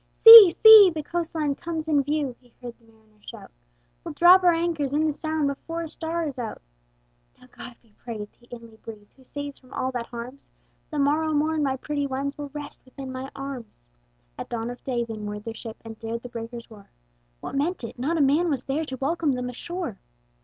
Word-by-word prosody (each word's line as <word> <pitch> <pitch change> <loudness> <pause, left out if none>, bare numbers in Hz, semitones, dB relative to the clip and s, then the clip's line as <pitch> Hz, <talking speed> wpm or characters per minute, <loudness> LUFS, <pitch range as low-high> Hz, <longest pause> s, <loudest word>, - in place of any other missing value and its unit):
"See, 450 -6 +11
see! 435 -3 +10
the 315 -3 -5
coast 335 +1 -4
line 300 -3 0
comes 320 +1 -6
in 295 -3 +2
view!" 290 -2 -2
He 245 -2 -26
heard 245 -2 -8
the 230 - -27
mariners 215 -1 -29
shout, - - -12 0.5
"We'll - - -8
drop 360 +2 +6
our 355 - +5
anchors 330 -5 -2
in 310 +1 +1
the 310 - +1
Sound 315 0 -3
Before 330 +4 -5
a - - -6
star 330 +2 -4
is 275 -4 -6
out!" 230 -3 -6 0.8
"Now - - -18
God 245 0 -11
be 220 -3 -29
praised!" 215 -4 -8
he 240 - -25
inly 230 -2 -12
breathed, 215 -2 -13
"Who 265 - -22
saves 285 +1 -8
from 255 0 -22
all 260 - -2
that 245 -2 -5
harms; 245 +3 -9 0.4
The 305 - -6
morrow 305 +3 +1
morn 310 +1 0
my 270 -2 -1
pretty 285 +1 -3
ones 275 +1 -4
Will 290 -1 -7
rest 290 0 -9
within 260 0 -10
my 260 +1 -7
arms." 250 - -9 0.5
At - - -7
dawn 235 0 -4
of 245 - -12
day 240 -3 -2
they 225 -1 -7
moored 210 0 -7
their 225 - -6
ship, 225 0 -9
And 225 -1 -10
dared 230 +1 -6
the 245 - -8
breakers' 235 0 -9
roar: 205 -2 -15 0.5
What - - -8
meant 295 +3 -2
it? 230 - -8
not 310 +7 -1
a - - +1
man 300 +5 +2
was 270 -4 -2
there 295 +4 -2
To 260 -3 -7
welcome 300 +2 -1
them 250 0 -4
ashore! 340 - -6
275 Hz, 215 wpm, -24 LUFS, 235-315 Hz, 0.8 s, See